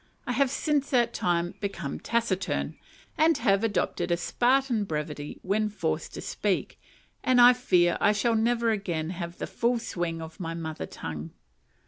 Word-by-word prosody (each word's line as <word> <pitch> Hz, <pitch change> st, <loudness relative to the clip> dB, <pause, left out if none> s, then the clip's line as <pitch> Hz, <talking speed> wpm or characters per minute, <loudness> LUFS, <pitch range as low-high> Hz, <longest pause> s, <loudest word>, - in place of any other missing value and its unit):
I -, -, -2 dB
have 265 Hz, +2 st, +2 dB
since 285 Hz, +1 st, 0 dB
that 240 Hz, -3 st, +2 dB
time 175 Hz, 0 st, 0 dB
become 190 Hz, -8 st, -4 dB
taciturn, 230 Hz, -5 st, -1 dB, 0.4 s
and 320 Hz, +1 st, +5 dB
have 200 Hz, -3 st, +2 dB
adopted 190 Hz, -4 st, 0 dB
a 170 Hz, -, +2 dB
Spartan 245 Hz, +4 st, +2 dB
brevity 150 Hz, -3 st, -4 dB
when 210 Hz, +3 st, +1 dB
forced 210 Hz, -, -3 dB
to -, -, -5 dB
speak, -, -, -2 dB, 0.4 s
and 255 Hz, -1 st, +4 dB
I 245 Hz, +1 st, +9 dB
fear 180 Hz, -8 st, +2 dB
I 205 Hz, -, +5 dB
shall 220 Hz, +3 st, +1 dB
never 230 Hz, +1 st, +2 dB
again 175 Hz, -6 st, -2 dB
have 170 Hz, -1 st, -6 dB
the -, -, -3 dB
full 240 Hz, +1 st, 0 dB
swing 175 Hz, -7 st, -3 dB
of 160 Hz, -1 st, -9 dB
my 165 Hz, -2 st, -4 dB
mother 160 Hz, -2 st, -5 dB
tongue. 80 Hz, 0 st, -7 dB
200 Hz, 160 wpm, -27 LUFS, 170-240 Hz, 0.4 s, I